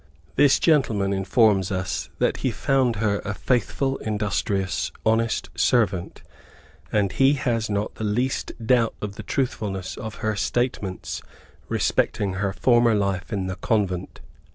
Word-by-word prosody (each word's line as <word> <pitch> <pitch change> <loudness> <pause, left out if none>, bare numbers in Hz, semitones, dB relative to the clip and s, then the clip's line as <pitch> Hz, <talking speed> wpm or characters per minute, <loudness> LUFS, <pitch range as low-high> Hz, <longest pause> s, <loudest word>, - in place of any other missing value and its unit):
This 145 -2 +5
gentleman 110 - +2
informs 95 0 +3
us 90 -5 -2
that - - +1
he - - 0
found 130 -4 +1
her 100 -1 0
a 100 - -3
faithful, 135 +3 0
industrious, 105 -3 -1
honest 110 -5 +1
servant, 95 0 +1 0.7
and 100 -3 +2
he 135 +1 +4
has 115 -5 -1
not 100 0 -1
the - - -7
least 120 +5 -1
doubt 115 -1 +3
of 105 -1 -4
the - - -8
truthfulness 100 -8 -2
of 110 -2 -6
her 110 -1 +1
statements 105 -3 -2 0.5
respecting 100 -2 0
her 95 +1 -1
former 120 +1 +3
life 100 -2 -1
in 100 -3 -1
the 95 +1 -4
Convent. 95 -4 -1
105 Hz, 135 wpm, -24 LUFS, 95-120 Hz, 0.7 s, This